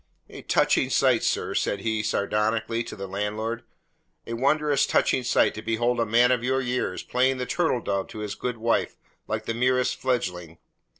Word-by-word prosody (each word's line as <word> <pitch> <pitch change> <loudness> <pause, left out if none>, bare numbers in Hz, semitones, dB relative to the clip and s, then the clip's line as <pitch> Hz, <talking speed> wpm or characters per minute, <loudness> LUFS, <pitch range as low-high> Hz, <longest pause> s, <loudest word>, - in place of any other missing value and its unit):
"A - - -10
touching - - +2
sight, - - +3
sir," - - 0
said 100 - -1
he 110 -1 -1
sardonically 110 +2 0
to - - -7
the 100 - -6
landlord. 105 +4 -3 0.6
"A 115 - -5
wondrous 145 +3 +2
touching - - +2
sight 125 - +2
to 110 - -7
behold 120 +2 0
a 115 - +1
man 120 +3 +4
of 125 -2 +1
your 130 +1 +1
years 125 -7 -2
playing 130 +1 +1
the 125 - -3
turtle 160 -5 0
dove 100 -2 -2
to - - -11
his 105 -1 -4
good 125 -2 -4
wife 115 +1 0 0.3
like 110 0 -3
the 115 - -2
merest 125 +2 +1
fledgeling. 90 -10 -2
115 Hz, 180 wpm, -25 LUFS, 105-125 Hz, 0.6 s, man